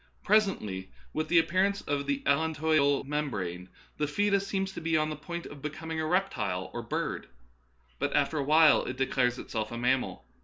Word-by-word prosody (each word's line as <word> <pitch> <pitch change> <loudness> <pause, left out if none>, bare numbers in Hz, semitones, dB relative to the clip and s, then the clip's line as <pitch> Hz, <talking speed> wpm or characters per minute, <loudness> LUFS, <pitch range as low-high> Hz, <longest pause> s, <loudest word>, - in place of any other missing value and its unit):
Pres 215 +1 +5
ently, 95 - -5 0.3
with 155 - -1
the 175 - +3
appearance 190 +4 +2
of 140 -1 -2
the 140 -1 -1
allantoidal 155 -1 +2
membrane, 100 - -3 0.3
the 150 - 0
foetus 200 +4 +1
seems 195 -1 -1
to 190 - -7
be 165 0 +1
on 155 0 0
the - - -3
point 170 +3 -6
of 145 -1 -10
becoming 160 +2 -4
a 155 - -1
reptile 110 - -1
or 120 - -3
bird; 115 - -3 0.7
but - - -1
after 150 +1 +2
a - - 0
while 155 +1 +6
it 130 - -5
declares 130 -2 +1
itself 110 -3 -4
a 115 - -4
mammal. 125 - 0
150 Hz, 185 wpm, -29 LUFS, 130-165 Hz, 0.7 s, while